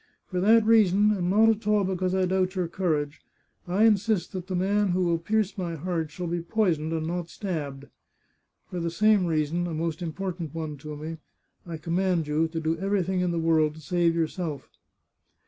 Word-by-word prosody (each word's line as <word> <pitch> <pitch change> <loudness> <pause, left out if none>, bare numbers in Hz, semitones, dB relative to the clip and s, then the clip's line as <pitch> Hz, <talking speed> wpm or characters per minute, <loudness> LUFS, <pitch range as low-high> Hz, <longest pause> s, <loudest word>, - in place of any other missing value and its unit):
For 180 - -1
that 220 +3 +5
reason, 210 -2 +5
and 180 -4 0
not 220 +4 +5
at 220 -1 0
all 210 -1 +3
because 185 0 -1
I 190 -1 +2
doubt 185 +1 0
your 180 -2 0
courage, 155 -5 -2 0.5
I 190 +5 +2
insist 210 -4 +2
that 185 -1 -6
the 185 - -3
man 200 +3 +2
who 185 +1 +1
will 170 -1 +1
pierce 210 +2 -1
my 170 -2 -3
heart 165 0 -2
shall 180 +4 -6
be 170 0 -2
poisoned, 170 -5 0
and 160 -1 -2
not 170 0 -3
stabbed. 145 -9 -5 0.9
For 180 - -3
the 170 0 -1
same 205 +1 +3
reason, 160 +2 0
a 165 - -4
most 165 +1 -3
important 170 -2 -4
one 155 -2 -4
to 150 +1 -8
me, 160 +2 -6 0.5
I 165 -1 -5
com 165 +2 -2
mand 185 -4 +1
you 155 +2 +1
to 165 0 -4
do 160 +1 0
everything 190 -1 0
in 180 - +1
the 170 - -1
world 160 -2 +2
to - - -11
save 170 +2 +1
yourself." 165 -3 -3
175 Hz, 200 wpm, -26 LUFS, 160-190 Hz, 0.9 s, that